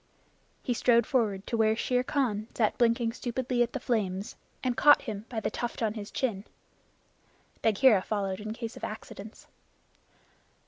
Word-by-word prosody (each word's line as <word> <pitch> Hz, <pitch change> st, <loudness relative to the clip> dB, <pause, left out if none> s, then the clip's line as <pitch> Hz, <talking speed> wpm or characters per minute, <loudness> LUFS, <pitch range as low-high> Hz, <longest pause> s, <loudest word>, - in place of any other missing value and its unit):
He 250 Hz, -, 0 dB
strode 235 Hz, -1 st, +3 dB
forward 210 Hz, -7 st, 0 dB
to -, -, -2 dB
where 220 Hz, -1 st, +3 dB
Shere 250 Hz, +2 st, +1 dB
Khan 250 Hz, -7 st, -1 dB
sat 215 Hz, -3 st, +2 dB
blinking 230 Hz, -1 st, +3 dB
stupidly 245 Hz, 0 st, -2 dB
at 240 Hz, 0 st, +1 dB
the 270 Hz, -, -2 dB
flames, 205 Hz, -5 st, -2 dB, 0.3 s
and 250 Hz, -2 st, 0 dB
caught 290 Hz, +3 st, +6 dB
him 215 Hz, -2 st, -5 dB
by 230 Hz, -, -3 dB
the -, -, -2 dB
tuft 240 Hz, -1 st, -3 dB
on 215 Hz, -2 st, +1 dB
his 210 Hz, -1 st, -7 dB
chin. 215 Hz, -7 st, -2 dB, 1.2 s
Bagheera 225 Hz, -1 st, +5 dB
followed 195 Hz, -2 st, -2 dB
in 215 Hz, +1 st, -5 dB
case 230 Hz, 0 st, -6 dB
of -, -, -12 dB
accidents. 215 Hz, 0 st, -8 dB
225 Hz, 155 wpm, -29 LUFS, 210-245 Hz, 1.2 s, caught